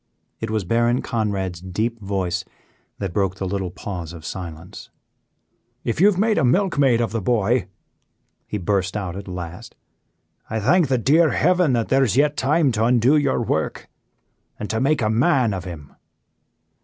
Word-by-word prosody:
It 110 - -4
was 110 -2 -1
Baron 120 +5 +1
Conrad's 100 -7 -2
deep 110 +6 -2
voice 95 -2 -2 0.5
that 95 -4 -4
broke 95 -1 0
the 95 - -4
little 95 -1 -2
pause 85 -2 -6
of 80 -2 -11
silence. 85 -2 -8 0.9
"If 115 +8 -1
you 200 - +7
have 205 -3 +2
made 215 +2 +2
a - - +1
milkmaid 140 - +3
of 115 - -1
the 115 0 -2
boy," 115 +1 +1 0.8
he 105 - -3
burst 95 +1 -1
out 95 -4 -4
at 100 +1 -7
last, 90 +5 -7 0.7
"I 110 - -1
thank 160 - +3
the 130 -1 +1
dear 155 +7 +4
heaven 180 -3 +3
that 115 -2 0
there 135 +1 +4
is 120 -2 0
yet 145 +1 +3
time 145 +1 +2
to 110 -1 0
undo 125 +4 +4
your 140 -5 +1
work 80 -8 -2 0.7
and 105 -1 -4
to 110 - -1
make 140 -1 +2
a 110 - +1
man 125 -1 +2
of 95 -2 -5
him." 80 -5 -9
110 Hz, 170 wpm, -22 LUFS, 95-130 Hz, 0.9 s, you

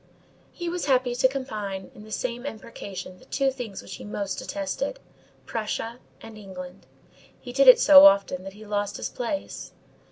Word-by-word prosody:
_ - - -35 0.5
He 345 - -6
was 350 +1 -2
happy 255 -2 +2
to 250 +2 +4
combine 210 -8 -5
in 210 - -13
the 215 - -13
same 240 +1 -3
imprecation 200 -7 -8
the - - -18
two 270 -1 +1
things 240 -7 -7
which - - -8
he - - -10
most 200 -2 -4
detested, 300 - -3 0.5
Prussia 225 +2 -4 0.2
and 225 -1 -11
England. 185 -2 -10 0.5
He 245 - -9
did 275 +1 +4
it 255 - +10
so 285 -6 +10
often 195 -2 +2
that 195 0 -8
he 215 +2 -13
lost 205 -1 -2
his - - -4
place. 260 +4 -5
230 Hz, 180 wpm, -26 LUFS, 200-265 Hz, 0.5 s, it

